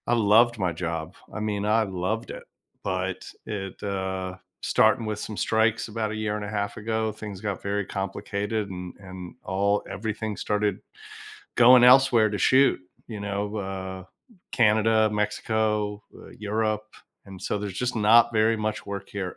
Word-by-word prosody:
I 120 - +2
loved 115 +2 +4
my 90 -4 0
job. 80 +1 -4 0.2
I - - -4
mean, 105 -1 -2
I 110 +1 +3
loved 95 +3 -3
it. - - -8 0.4
But 95 0 -2 0.2
it, 95 -3 -6
uh 95 -2 -3 0.3
starting 115 - +3
with 105 -1 -2
some 105 +1 -5
strikes 110 +1 +1
about 110 -1 -3
a - - -4
year 110 -1 -2
and 105 -1 -4
a - - -5
half 100 -1 -3
ago, 110 0 -1
things 105 -3 -8
got 105 -4 -3
very 100 +1 -1
complicated 100 +2 -3
and 90 -1 -7
and 95 -2 -9
all 100 +2 +1
everything 110 +1 -4
started 105 -2 0 0.8
going 125 +1 +8
elsewhere 125 -4 +6
to 105 - -3
shoot, 135 +6 +4 0.3
you 110 -3 -6
know, 100 +1 -3
uh, 95 -2 -5 0.5
Canada, 110 -1 +4
Mexico, 105 0 -1
uh, - - -13
Europe. 110 0 -1 0.4
And 95 -2 -11
so, 105 - -1
there's 100 -1 -4
just 125 -1 -1
not 115 +2 +5
very 110 0 +3
much 110 0 -3
work 100 -1 -6
here 95 -3 -5
105 Hz, 160 wpm, -26 LUFS, 100-110 Hz, 0.8 s, going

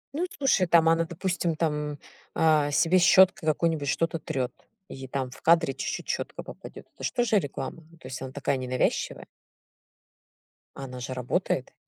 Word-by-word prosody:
Ну, 350 +4 -1
слушай, 230 -10 +2
там 165 -1 +5
она, 165 0 +3
допустим, 175 -1 -2
там, 150 -2 -2 0.4
а, 155 -2 +3
себе 170 +5 +3
щёткой 190 0 +5
какой-нибудь 160 -2 0
что-то 165 +1 0
трёт, 130 -5 -3 0.3
и 135 0 -8
там 130 -1 -3
в - - -13
кадре 165 -4 +4
чуть-чуть 135 - -4
щетка - - -3
попадёт. - - -11
Это - - -13
ж - - +1
тоже 240 -4 +2
реклама. 165 +1 -6
Ну, 170 - -18
то 145 - -12
есть, 130 -1 -6
она 130 -1 -6
такая 140 0 -1
ненавязчивая. 130 0 -1 1.5
А 135 - -6
она 125 -1 -8
же 125 +1 -5
работает. 125 -1 -2
160 Hz, 165 wpm, -27 LUFS, 135-170 Hz, 1.5 s, там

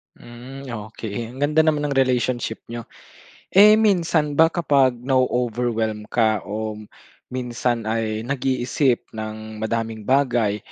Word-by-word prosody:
Hmm, 125 +3 -11 0.3
okey. 115 +2 -6
Ang - - -11
ganda 150 +2 +3
naman 150 -2 +2
ng 135 - 0
relationship 125 -3 0
n'yo. 120 -1 -6 0.7
Eh, 210 +3 +8
minsan 170 -8 +2
ba, 160 +2 +5
kapag 145 -7 +3
na-o-overwhelm 120 -4 0
ka 110 -4 +2
o 110 +1 -4 0.6
minsan 120 -2 -2
ay 110 0 -2
nag-iisip 130 -1 0
ng 110 0 -7
madaming 115 -1 -2
bagay, 120 -4 +1
120 Hz, 120 wpm, -22 LUFS, 110-135 Hz, 0.7 s, Eh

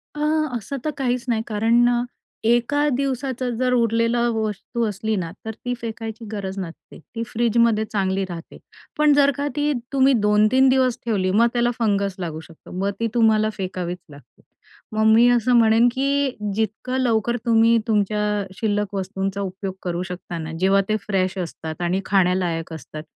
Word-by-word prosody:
अ, 295 - -5 0.4
असं 235 +5 -5
तर 310 - 0
काहीच 250 -1 -1
नाही. 225 -2 +1
कारण 230 +3 +3
अ, 240 0 +1 0.5
एका 265 +5 +2
दिवसाचं 260 -2 -2
जर 255 +1 +1
उरलेलं 230 0 +2
वस्तू 220 +2 -2
असली 210 +2 -2
ना, 170 -3 -3
तर 220 - -4
ती 245 0 -1
फेकायची 225 0 -6
गरज 195 -2 -4
नसते, 170 -4 -8 0.2
ती 230 - -3
फ्रिजमध्ये 230 -1 +2
चांगली 195 -2 -1
राहते. 170 -2 -9 0.4
पण 300 -1 +5
जर 285 0 +5
का 285 - -2
ती 295 0 +1 0.2
तुम्ही 270 0 +4
2-3 215 +6 +4
दिवस 260 -2 +3
ठेवली, 195 -5 0
मग 225 +5 +4
त्याला 240 0 +2
फंगस 200 -4 +1
लागू 160 -3 -4
शकतो. 160 +1 -16
मग 195 +1 0
ती 230 - +1
तुम्हाला 220 -2 +3
फेकावीच 180 -2 -4
लागते. 140 -3 -17 0.5
मग 215 0 +1
मी 235 +2 +6
असं 245 +1 +2
म्हणेन 230 +1 +5
की 275 +1 +1 0.2
जितकं 220 +4 -2
लवकर 235 -1 +1
तुम्ही 230 0 +5
तुमच्या 210 -1 +1 0.3
शिल्लक 205 -2 -1
वस्तूंचा 195 0 -3
उपयोग 190 0 -4
करू 175 -1 -2
शकता 180 -1 -6
ना, 160 0 -6
जेव्हा 195 +1 +4
ते 215 - +2
फ्रेश 190 -2 0
असतात 160 -2 -5
आणि 175 +2 0
खाण्यालायक 180 -4 +1
असतात. 155 -1 -8
220 Hz, 165 wpm, -22 LUFS, 190-240 Hz, 0.5 s, मी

